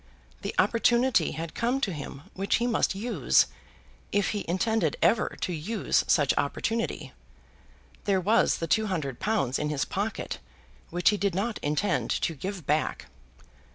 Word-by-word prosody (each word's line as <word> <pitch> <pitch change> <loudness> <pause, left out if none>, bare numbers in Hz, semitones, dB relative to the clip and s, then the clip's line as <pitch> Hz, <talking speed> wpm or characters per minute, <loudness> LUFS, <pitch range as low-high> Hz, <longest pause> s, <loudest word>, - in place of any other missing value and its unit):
The - - -4
opportunity 235 -4 +3
had 165 0 -5
come 245 +3 0
to 195 -8 0
him 140 -2 -7
which 195 +1 0
he 240 - +1
must 230 -5 +1
use, 230 +5 +3 0.7
if 205 -1 +2
he 205 -2 -2
intended 220 +6 +1
ever 230 - +2
to 180 - -1
use 185 +7 0
such 145 -7 +4
opportunity. 225 +10 -2 0.9
There 195 -2 +3
was 215 +5 +3
the 165 - -2
two 220 +5 +2
hundred 150 -10 -3
pounds 190 - 0
in 150 - -1
his 150 -2 0
pocket, 205 +3 -3 0.5
which 175 0 +3
he 210 - 0
did 200 -3 0
not 215 +4 -1
intend 150 +7 0
to 165 - 0
give 185 +2 -6
back. 150 - -1
195 Hz, 155 wpm, -27 LUFS, 160-220 Hz, 0.9 s, such